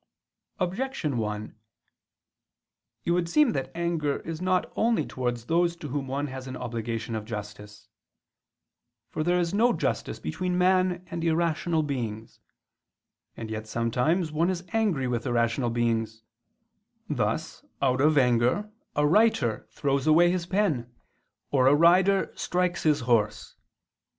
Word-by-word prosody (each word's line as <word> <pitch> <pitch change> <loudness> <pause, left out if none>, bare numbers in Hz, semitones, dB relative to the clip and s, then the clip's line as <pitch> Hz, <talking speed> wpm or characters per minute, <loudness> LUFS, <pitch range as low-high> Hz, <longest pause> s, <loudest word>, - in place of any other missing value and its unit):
Objection 180 - -2
1: 105 0 -4 1.5
It - - +1
would 170 -1 +1
seem 300 - +4
that 135 -2 -3
anger 165 -4 -1
is 165 0 -6
not 185 0 0
only 230 +1 +2
towards 120 -2 -3
those 170 +2 +1
to 165 -3 -8
whom 140 0 -3
one 140 +2 -2
has 130 -1 -7
an 130 0 -6
obligation 115 -1 -4
of 110 -1 -3
justice. 105 -1 -8 1.2
For 155 - -2
there 175 +2 +2
is 170 0 -1
no 235 +4 +3
justice - - -2
between 180 -1 -2
man 185 -1 +2
and 170 -1 -4
irrational 165 0 +1
beings. 115 -6 -5 1.0
And 110 -1 -6
yet 110 0 -5
sometimes 125 - 0
one 165 +4 +1
is 180 -1 -3
angry 200 - +1
with 120 -2 -2
irrational 120 +1 +1
beings; 115 -1 -1 0.8
thus, - - -2 0.2
out 130 -1 +1
of 150 +1 +4
anger, 125 - +2 0.2
a 150 - +2
writer 150 - +2
throws 140 0 -1
away 170 +3 +6
his 180 -2 -2
pen, 170 - 0 0.6
or 130 -2 +4
a 140 - +6
rider 180 +5 +4
strikes 180 0 -1
his 150 -3 +2
horse. 105 -3 0
145 Hz, 135 wpm, -27 LUFS, 120-175 Hz, 1.5 s, away